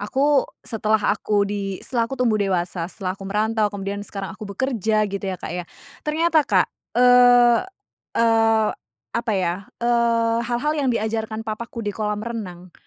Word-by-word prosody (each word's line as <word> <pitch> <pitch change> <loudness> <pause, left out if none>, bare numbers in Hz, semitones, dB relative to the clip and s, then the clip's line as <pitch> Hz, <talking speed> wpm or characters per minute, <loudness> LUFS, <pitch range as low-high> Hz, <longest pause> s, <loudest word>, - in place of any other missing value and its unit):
Aku, 275 +6 +2 0.2
setelah 220 -1 +1 0.2
aku 205 -1 +1
di 200 -1 -3
setelah 235 -2 -1
aku 270 - -5
tumbuh 230 -5 +1
dewasa, 180 -3 -1
setelah 185 -1 -4
aku 195 0 -9
merantau, 215 +1 +1
kemudian 200 0 -5
sekarang 195 -1 -6
aku 210 0 -9
bekerja 220 -1 0
gitu 200 -1 -4
ya, 190 -1 -2
Kak, - - -7
ya, 180 0 -4 0.4
ternyata, 320 +1 +2
Kak, 290 - +2 0.3
eee 245 -1 +6 0.6
eee, 225 -1 +3 0.4
apa 235 -1 -1
ya, 185 +1 -2
eee, 235 -1 +2
hal-hal 245 +5 -1
yang 290 -3 0
diajarkan 220 -1 -2
papaku 225 +1 -5
di 205 - -2
kolam 210 +1 -3
renang, 185 -7 -7
220 Hz, 155 wpm, -22 LUFS, 200-235 Hz, 0.6 s, eee